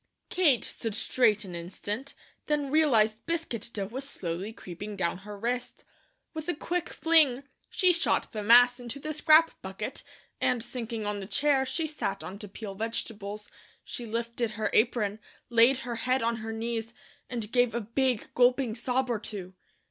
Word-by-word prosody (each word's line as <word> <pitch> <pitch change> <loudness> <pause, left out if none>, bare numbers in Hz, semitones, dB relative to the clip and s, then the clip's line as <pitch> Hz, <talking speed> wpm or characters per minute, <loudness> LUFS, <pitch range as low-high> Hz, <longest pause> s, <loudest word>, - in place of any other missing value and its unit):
Kate 310 -10 +3
stood 225 -3 -3
straight 215 -3 +2
an 180 - -8
instant, 205 +9 -5 0.3
then 290 -2 0
realized 230 -9 +4
biscuit 325 -10 -2
dough 200 -3 -3
was 265 +7 -4
slowly 180 +2 -4
creeping 205 0 -8
down 180 -2 -1
her 205 +1 -9
wrist. 245 +4 -3 0.5
With 315 0 -6
a 350 - 0
quick 350 +3 -2
fling, 305 -6 +3 0.3
she 365 -2 +5
shot 335 - +2
the 215 - -4
mass 245 +3 +6
into 245 +3 -6
the 305 +2 -4
scrap 315 +2 +6
bucket 195 +6 -5 0.4
and 245 -3 +2
sinking 230 -3 -5
on 205 0 -2
the 195 - -7
chair 270 +2 +2
she 325 +3 -1
sat 295 -10 -3
on 195 +2 -7
to 210 - -7
peel 200 +1 -7
vegetables, 210 -1 -4 0.4
she 240 - -7
lifted 235 +1 -2
her 215 - -1
apron, 215 -2 +2 0.3
laid 235 +3 +6
her 240 -2 -3
head 255 +1 +1
on 230 0 +1
her 225 0 -5
knees, 225 0 -3 0.3
and 230 -4 -4
gave 245 -2 +3
a - - +1
big 245 +2 -1
gulping 250 -1 +3
sob 250 +3 0
or 235 -3 -1
two. 195 -3 -6
235 Hz, 170 wpm, -29 LUFS, 210-265 Hz, 0.5 s, mass